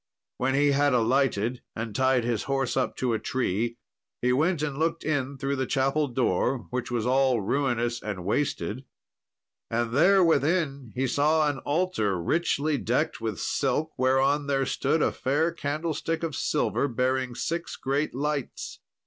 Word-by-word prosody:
When 135 +1 0
he 145 +1 +4
had 140 -1 +3
alighted 120 -1 +1
and 115 -1 -4
tied 130 +1 +2
his 115 -3 -1
horse 135 -2 -1
up 130 - 0
to 125 -2 0
a 110 - 0
tree, 115 0 -1 0.4
he 125 0 +2
went 155 +3 +1
and 145 -2 -3
looked 165 +1 0
in 140 -3 -1
through 140 +1 -2
the 130 -1 -1
chapel 135 +3 +1
door, 125 0 0
which 125 -1 -3
was 120 -2 -1
all 130 -1 +3
ruinous 120 +1 0
and 100 -4 -5
wasted, 110 -1 -1 0.9
and 115 0 -1
there 185 +7 +5
within 145 -5 +1
he 130 +1 0
saw 150 +4 +2
an 145 -2 -1
altar, 145 - 0
richly 150 - 0
decked 120 0 -1
with 110 -4 -3
silk, 150 +4 0
whereon 135 +3 +2
there 135 -1 +1
stood 145 +4 +1
a - - +2
fair 150 +6 0
candlestick 160 +1 -3
of 160 -3 -2
silver, 150 -1 0
bearing 130 0 -1
six 170 +6 -3
great 140 +1 -1
lights. 145 -1 -3
135 Hz, 155 wpm, -27 LUFS, 120-145 Hz, 0.9 s, there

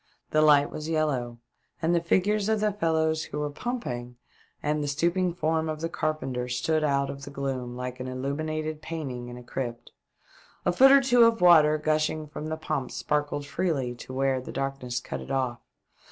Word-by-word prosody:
The 155 - +4
light 145 -2 +5
was 155 +1 -5
yellow, 135 -7 0 0.4
and 165 +1 +1
the 170 - +3
figures 200 +5 +1
of 220 -1 +2
the 210 0 +2
fellows 160 -4 +1
who - - -6
were 150 0 -2
pumping 125 - -4 0.5
and 150 0 0
the - - -2
stooping 170 +5 +1
form 160 -1 0
of 155 -1 -3
the 165 - -1
carpenter 150 -7 -2
stood 155 +6 0
out 140 -2 +1
of 140 0 -9
the 140 - -7
gloom 135 -3 -4
like 125 0 -5
an 130 - -4
illuminated 155 +4 -3
painting 140 -7 -5
in 120 0 -8
a 125 - -10
crypt. 120 -1 -5 0.7
A 180 - +4
foot 265 +9 +7
or 275 0 +8
two 245 -2 +5
of 230 -1 +3
water 155 -4 +6
gushing 155 0 0
from 150 +1 -7
the 160 - -2
pump 155 -5 -3
sparkled 145 -1 -1
freely 140 -4 -1
to 120 - -10
where 135 0 +1
the - - -8
darkness 135 -3 -3
cut 70 - -6
it 65 - -10
off. 130 -3 -1
150 Hz, 190 wpm, -27 LUFS, 130-160 Hz, 0.7 s, or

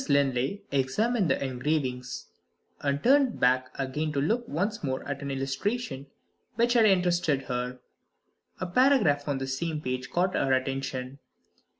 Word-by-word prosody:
Linley 140 +6 +1
examined 180 - +1
the - - +1
engravings 130 -1 -2 0.5
and 140 0 -1
turned 270 -1 +4
back 130 +1 +3
again 145 +3 -2
to 140 - 0
look 225 - 0
once 200 +8 -2
more 130 -2 -2
at 140 0 -4
an 140 - -4
illustration 135 - -2 0.5
which 235 +2 +3
had 235 -3 +5
interested 175 -7 +2
her. 125 0 -3 0.8
A - - -2
paragraph 175 - +3
on 140 -2 0
the 135 - -3
same 150 +4 -2
page 130 -2 -3
caught 185 +2 +1
her 135 -1 +2
attention. 135 0 -2
140 Hz, 140 wpm, -28 LUFS, 130-185 Hz, 0.8 s, had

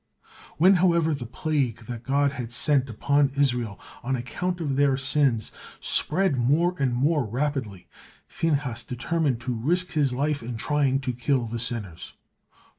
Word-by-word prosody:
When, 185 +5 +6
however, 170 -3 +3
the 130 -5 -5
plague 135 -3 -1
that 115 0 -7
God 140 +2 +1
had 125 -4 -6
sent 135 +1 +2
upon 140 +5 +2
Israel 120 -7 0 0.2
on 130 +2 -1
account 175 +9 -3
of 145 -5 -2
their 140 -1 +3
sins 135 -4 +1 0.3
spread 160 -4 +1
more 155 +9 +2
and 130 -3 +1
more 145 +3 +2
rapidly, 120 -5 -3 0.4
Phinehas 140 -7 -1
determined 130 +2 -1
to 125 0 -2
risk 175 +11 0
his 145 -4 +1
life 145 +3 -1
in 115 0 -5
trying 140 +1 +1
to 130 -1 -2
kill 125 +1 0
the 115 +1 -4
sinners. 110 -7 -4
135 Hz, 150 wpm, -25 LUFS, 120-150 Hz, 0.4 s, When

